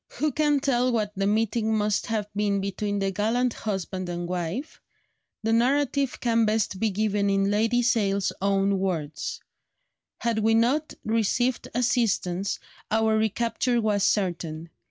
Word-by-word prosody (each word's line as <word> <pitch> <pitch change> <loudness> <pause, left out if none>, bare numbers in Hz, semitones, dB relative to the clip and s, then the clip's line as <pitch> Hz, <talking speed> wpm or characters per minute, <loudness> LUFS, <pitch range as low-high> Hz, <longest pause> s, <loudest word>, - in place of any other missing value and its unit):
Who 305 0 0
can 295 0 +2
tell 255 -2 +2
what 215 -3 0
the 195 +1 0
meeting 220 +1 +1
must 210 -1 0
have 215 -2 -1
been 205 -1 +1
between 200 +1 -2
the 195 -1 0
gallant 230 +5 0
husband 190 -3 -4
and 175 0 -3
wife? 180 - -4 0.6
The 225 +1 +1
narrative 275 +2 +1
can 230 -1 +2
best 215 -3 0
be 225 - +2
given 205 0 0
in 195 0 +2
Lady 225 +4 +2
Sale's 200 -5 +1
own 195 0 +2
words: 160 -6 -3 0.8
"Had 230 -2 0
we 225 +1 +3
not 270 +7 +1
received 230 +3 0
assistance, 210 -6 0 0.3
our 220 0 +2
recapture 230 +3 0
was 210 -3 +1
certain.... 170 -5 -1
215 Hz, 140 wpm, -26 LUFS, 195-235 Hz, 0.8 s, we